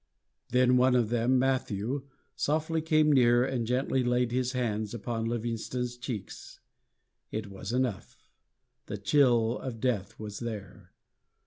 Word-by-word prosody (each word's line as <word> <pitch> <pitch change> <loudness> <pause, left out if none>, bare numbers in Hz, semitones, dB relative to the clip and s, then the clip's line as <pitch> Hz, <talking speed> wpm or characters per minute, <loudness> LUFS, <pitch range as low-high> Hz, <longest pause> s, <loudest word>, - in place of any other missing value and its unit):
Then 125 0 +4
one 125 0 +4
of 120 -4 +2
them, 120 +2 +2
Matthew, 130 0 -1 0.3
softly 155 +4 0
came 155 -1 +3
near 120 -2 +5
and 125 -4 -2
gently 130 +1 +1
laid 125 0 +1
his 125 +1 0
hands 110 -3 -2
upon 115 -1 -3
Livingstone's 120 +1 -3
cheeks. 120 -5 -7 0.7
It 105 -2 -5
was 100 +2 -6
enough; 125 -6 -2 0.7
the 105 - -4
chill 120 +1 +3
of 125 -4 -6
death 110 -6 -1
was 105 -1 -7
there. 110 -4 -7
125 Hz, 130 wpm, -29 LUFS, 115-130 Hz, 0.7 s, near